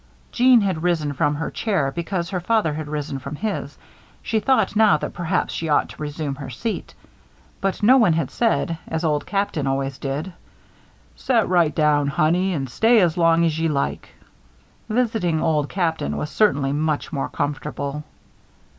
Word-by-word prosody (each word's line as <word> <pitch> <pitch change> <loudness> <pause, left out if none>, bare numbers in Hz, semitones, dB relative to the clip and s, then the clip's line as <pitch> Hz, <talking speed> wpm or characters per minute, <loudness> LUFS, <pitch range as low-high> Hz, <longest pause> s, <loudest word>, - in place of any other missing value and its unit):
Jeanne 250 -1 +5
had 190 -6 -1
risen 160 -4 0
from 145 +2 +1
her 160 +2 -4
chair 190 -12 0
because 170 +2 -3
her 185 - -1
father 195 -3 +1
had 155 0 -5
risen 150 -2 -4
from 140 +3 -7
his. 215 +7 -4 0.5
She 220 - 0
thought 220 -5 +1
now 215 -6 +5
that - - -5
perhaps 175 +2 -1
she 165 - -3
ought 145 - +2
to - - -12
resume 145 -1 -3
her 135 -1 -8
seat; 210 - -5 0.7
but 195 +1 -2
no 255 +5 +7
one 215 -10 +4
had 165 +1 -1
said, 190 -8 0
as 160 +1 -3
Old 150 -2 0
Captain 195 -8 -1
always 135 0 -2
did: 145 +6 -4 0.8
"Set 235 -5 +1
right 170 -5 +2
down, 150 -2 +2
Honey, 165 +6 +1
an' 135 -3 -2
stay 225 - +3
as 175 -4 +2
long 165 -1 +3
as 160 -1 0
ye 165 - +1
like." 140 -3 -2 0.8
Visiting 215 -8 0
Old 155 -3 0
Captain 165 -4 -1
was 150 - -4
certainly 145 -6 +2
much 155 +1 -1
more 140 - -2
comfortable. 145 0 -3
160 Hz, 170 wpm, -22 LUFS, 145-195 Hz, 0.8 s, no